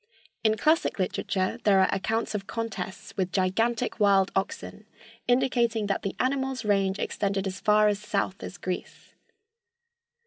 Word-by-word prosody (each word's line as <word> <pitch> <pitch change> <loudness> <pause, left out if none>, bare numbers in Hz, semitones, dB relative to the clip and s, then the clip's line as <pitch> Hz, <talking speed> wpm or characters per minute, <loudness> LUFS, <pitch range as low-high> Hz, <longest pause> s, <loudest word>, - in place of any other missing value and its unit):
In 220 -1 +3
classic 315 +9 +2
literature 190 +2 -1
there 200 -2 +5
are 190 - +4
accounts 225 +4 -1
of 195 -2 -4
contests 195 -5 -5
with 185 -2 -1
gigantic 225 +7 0
wild 195 -2 +4
oxen, 205 +2 -3 0.4
indicating 245 -3 +2
that 200 - -1
the 195 - -3
animal's 265 -1 -1
range 195 -1 +2
extended 195 -1 -1
as 190 0 -4
far 210 0 +4
south 200 -2 -2
as 200 - -7
Greece. 180 -2 -6
205 Hz, 135 wpm, -27 LUFS, 195-230 Hz, 0.4 s, there